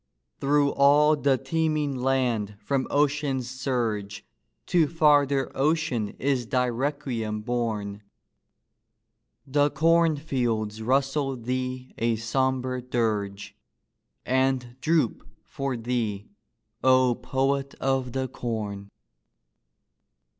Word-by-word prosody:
Through 140 0 +3
all 145 +2 +5
the 140 -2 +2
teeming 155 +1 0
land 125 -5 0
from 135 +4 -1
ocean's 145 -3 +1
surge 120 -6 -3 0.4
To 165 -4 +3
farther 145 -4 +3
ocean 140 -7 0
is 130 -3 0
thy 125 0 +1
requiem 120 -4 -2
borne: 110 -4 -3 1.4
The 145 +1 +2
corn 165 +1 +3
fields 115 -7 -2
rustle 135 +2 0
thee 130 +1 -4
a 115 0 +1
sombre 130 +2 -1
dirge 105 -5 -2 0.7
And 130 -1 0
droop 160 -6 +1 0.2
for 135 -2 -4
thee, 115 -4 -3 0.5
O 130 -1 +5
poet 135 +3 -1
of 135 -2 -1
the 130 0 -1
corn 105 -5 -5
130 Hz, 95 wpm, -26 LUFS, 115-140 Hz, 1.4 s, all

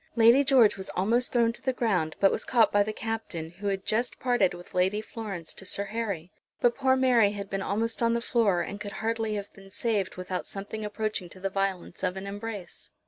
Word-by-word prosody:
Lady 235 +4 +6
George 260 -7 +5
was 190 - -4
almost 230 +7 +2
thrown 230 -1 +3
to - - -11
the 260 - +1
ground, 185 -11 0
but 195 - +5
was - - -1
caught 230 -4 +4
by 205 - +4
the 210 +1 0
Captain, 215 -8 -4
who 195 +4 -6
had 195 -1 -1
just 235 +3 0
parted 245 -8 +2
with 175 0 -12
Lady 185 +3 +2
Florence 210 -6 -6
to - - -7
Sir 195 +1 -1
Harry. 200 -5 -4 0.3
But 240 -1 +4
poor 265 -1 +3
Mary 245 -6 +4
had 200 -1 -6
been 195 0 -1
almost 225 +5 -1
on 230 0 +3
the - - +1
floor, 225 -6 +2
and 200 0 -7
could 205 0 -5
hardly 225 -1 -1
have 200 -1 -5
been 195 0 -15
saved 205 -1 -1
without 185 0 -4
something 205 +2 -6
approaching 210 -3 -3
to 185 - -13
the 195 +1 -2
violence 195 -2 -2
of 185 0 -1
an 190 - -5
embrace. 205 -2 -6
205 Hz, 220 wpm, -28 LUFS, 195-230 Hz, 0.3 s, Lady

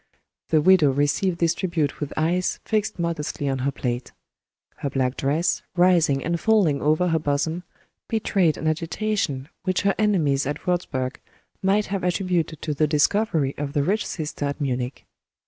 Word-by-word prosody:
The 155 -2 +4
widow 180 -3 +6
received 145 +6 +1
this 170 -1 +2
tribute 170 -6 -1
with 145 -1 -4
eyes 175 +3 0
fixed 215 -1 -1
modestly 165 -4 -2
on 135 -1 -1
her 135 +2 0
plate. 125 -2 -3 0.7
Her 140 - -3
black 130 -1 0
dress, 150 +5 0
rising 170 -6 +3
and 170 +1 0
falling 195 -11 +3
over 155 +4 +2
her 165 -1 +2
bosom, 155 +3 -1 0.5
betrayed 195 -8 +1
an - - -6
agitation, 160 -3 -1
which 185 -1 0
her 200 -1 +2
enemies 155 -11 +2
at 145 - -4
Wurzburg 135 -8 -1 0.4
might 200 +2 +2
have 195 - -2
attributed 180 -3 -1
to 155 - -1
the 150 +2 +2
discovery 150 -1 +2
of 145 -1 -3
the 145 - +1
rich 205 +8 +1
sister 150 -3 -4
at 145 +2 -3
Munich. 130 -2 -3
160 Hz, 160 wpm, -24 LUFS, 140-180 Hz, 0.7 s, widow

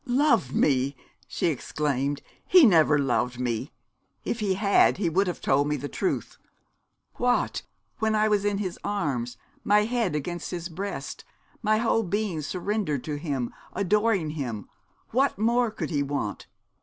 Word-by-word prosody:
'Loved 255 - +3
me!' 135 -1 +2 0.3
she - - -2
exclaimed; 145 -2 -1 0.2
'he 360 -5 +8
never 160 -7 +5
loved 125 -3 0
me. 120 -3 -2 0.5
If 235 - -2
he 200 -3 +1
had 200 +1 +4
he 185 -4 0
would 190 +4 +2
have 175 - -3
told 140 +2 +2
me 150 - 0
the 145 +2 -5
truth. 365 - -3 0.8
What, 245 0 +1 0.4
when 220 -1 +1
I 215 0 +3
was 210 -2 +2
in 205 -1 +1
his 190 -3 -4
arms, 130 - -2 0.3
my 210 +1 +4
head 225 -6 0
upon 175 +4 -3
his 175 0 -5
breast, 195 +5 -5 0.4
my 215 -1 +2
whole 225 0 +2
being 200 -4 -2
surrendered 180 - -2
to 150 -2 -3
him, 140 -6 -3 0.2
adoring 200 -3 +1
him, 120 - -4 0.4
what 270 +1 +2
more 235 +3 +2
could 215 - -5
he 145 -3 +1
want? 140 -7 -3
175 Hz, 155 wpm, -26 LUFS, 145-215 Hz, 0.8 s, he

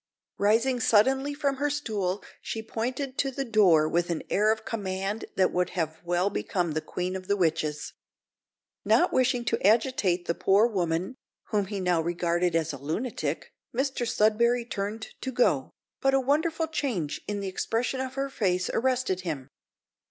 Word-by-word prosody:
Rising 230 +5 +3
suddenly 265 +6 +3
from 280 -2 0
her 290 +2 0
stool, 210 -10 -2 0.2
she 225 - -4
pointed 255 +5 -3
to 275 - +2
the 270 +1 -3
door 190 -9 +5
with 170 +2 0
an 170 -2 -2
air 210 +2 +4
of 220 0 -3
command 200 -1 -3
that 190 -1 +3
would 180 0 0
have 160 -1 -2
well 175 +3 +1
become 180 -4 -1
the 155 +1 -1
queen 180 +3 -3
of 185 0 -6
the 200 - +1
witches. 155 -4 -1 0.9
Not 355 - +3
wishing 250 -1 +2
to 230 - -1
agitate 205 -4 +2
the - - 0
poor 195 +5 +4
woman, 185 +1 -1 0.3
whom 205 -3 +1
he 200 0 -4
now 180 -3 +2
regarded 175 +1 0
as 165 -1 0
a 140 - -7
lunatic, 155 - -3 0.2
Mr 265 -2 0
Sudberry 230 +2 +2
turned 210 +1 -4
to 260 - -3
go, 150 - +2 0.3
but 270 0 +3
a - - +4
wonderful 315 +5 +1
change 245 - -2
in 205 -1 -2
the 200 - -3
expression 230 +7 -1
of 260 0 -4
her 275 0 -2
face 185 -6 0
arrested 250 -7 0
him. 150 -7 -5
210 Hz, 165 wpm, -27 LUFS, 175-255 Hz, 0.9 s, door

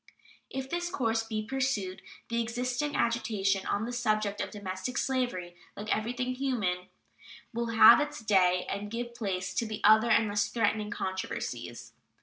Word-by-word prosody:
If 265 0 -4
this 345 +4 -2
course 230 -10 0
be 220 -1 -4
pursued, 240 -7 -1 0.3
the 235 0 +1
existing 250 +5 -2
agitation 205 -4 0
on 205 +2 0
the 245 - -5
subject 215 -4 0
of - - -3
domestic 205 +4 -5
slavery, 245 -10 -1 0.2
like 210 +2 0
everything 250 +3 -2
human, 215 -9 -1 0.7
will 235 +1 -1
have 230 0 +8
its 295 0 -3
day 185 -4 +3
and 200 +1 -4
give 240 +2 -4
place 195 -5 -3
to 215 -2 -2
other 220 +2 +6
and 220 -1 +4
less 205 0 +1
threatening 215 -2 0
controversies. 190 -2 -4
220 Hz, 145 wpm, -30 LUFS, 200-245 Hz, 0.7 s, have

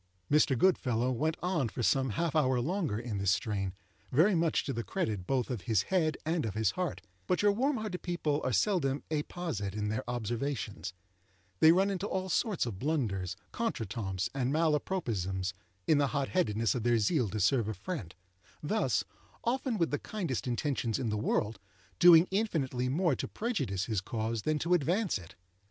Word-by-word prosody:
Mr. 145 -3 +4
Goodfellow 125 -8 +2
went 155 +6 0
on 165 -9 +1
for 115 +5 -4
some 135 +2 +2
half 170 -2 0
hour 130 -5 +3
longer 160 - -1
in 115 -3 -4
this 100 -1 +1
strain, 100 -1 0 0.4
very 165 +10 +5
much 165 -2 +2
to 135 - -3
the 115 - -3
credit 95 -1 -2
both 130 -2 0
of 120 -6 -3
his 105 -4 +3
head 160 -4 +2
and 165 +1 0
of 110 -4 -3
his 110 -3 +2
heart; 180 -4 -3 0.3
but 180 - +1
your 205 - +6
warm 260 +6 +1
hearted 215 -5 -4
people 160 -4 -1
are - - 0
seldom 145 - +1
apposite 150 - -3
in 105 -1 -1
their 110 - -2
observations—they 100 - -1
run 190 +3 +3
into 195 +1 -2
all 190 -1 -2
sorts 205 - +1
of 105 -6 -5
blunders, 105 - -1 0.2
contre 230 - -2
temps 95 -3 -3
and 130 -1 0
mal 155 0 +3
apropos 185 +4 -2
isms, 95 -2 -2 0.3
in 150 - +4
the 140 - +3
hot 140 -1 0
headedness 115 - +1
of 125 - -2
their 120 +1 +3
zeal 115 - +1
to 110 - -3
serve 110 +3 +3
a 110 - -2
friend—thus, 95 - -3 0.4
often 250 -1 0
with 165 -3 +1
the 145 - 0
kindest 175 - -3
intentions 125 -2 -1
in 130 -4 -2
the 105 - -1
world, 105 0 0 0.4
doing 175 0 +8
infinitely 140 - 0
more 160 +1 +2
to - - -4
prejudice 150 - -2
his 110 -5 -1
cause 110 +1 -2
than 155 +6 0
to 170 +4 +1
advance 175 - +1
it. 90 -1 -13
130 Hz, 180 wpm, -31 LUFS, 105-170 Hz, 0.4 s, doing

